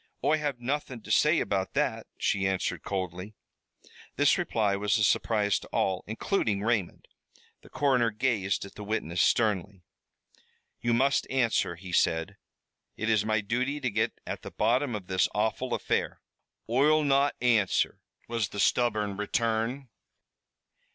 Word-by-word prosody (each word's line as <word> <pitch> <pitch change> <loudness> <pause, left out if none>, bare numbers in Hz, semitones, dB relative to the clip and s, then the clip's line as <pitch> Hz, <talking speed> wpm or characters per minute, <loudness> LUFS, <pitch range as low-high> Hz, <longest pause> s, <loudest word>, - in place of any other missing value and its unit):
"Oi 155 +1 +3
have 145 -4 -2
nothin' 130 -2 -3
to 110 - -7
say 155 +8 +4
about 95 -1 -2
that," - - 0
she 95 -1 0
answered 95 -1 -1
coldly. 95 +1 -4 0.8
This - - +4
reply 105 -3 0
was 100 0 +1
a 105 - +1
surprise 105 -1 +2
to - - -12
all, 95 -1 -1
including 110 - -1
Raymond. 110 -6 -1 0.5
The - - -17
coroner 130 -4 +2
gazed 105 -4 -1
at 100 - -12
the 105 - -9
witness 95 -5 -1
sternly. 100 -4 +1 1.0
"You 120 0 +1
must 135 +3 +2
answer," 120 -9 +1
he 90 +2 -10
said. 85 +3 +1 0.6
"It 110 +1 0
is 105 -2 +3
my 110 -1 +1
duty 125 +7 -1
to 130 -4 -2
get 110 +2 -1
at - - -5
the - - -8
bottom 125 0 +1
of 100 -3 -6
this 95 0 +1
awful 110 +4 -1
affair." - - -1 0.5
"Oi'll 150 +6 +3
not 140 0 +2
answer," 115 -6 +2 0.3
was 115 -3 -1
the 100 - -7
stubborn 105 -3 +1
return. 115 +5 -1
110 Hz, 145 wpm, -28 LUFS, 100-125 Hz, 1.0 s, say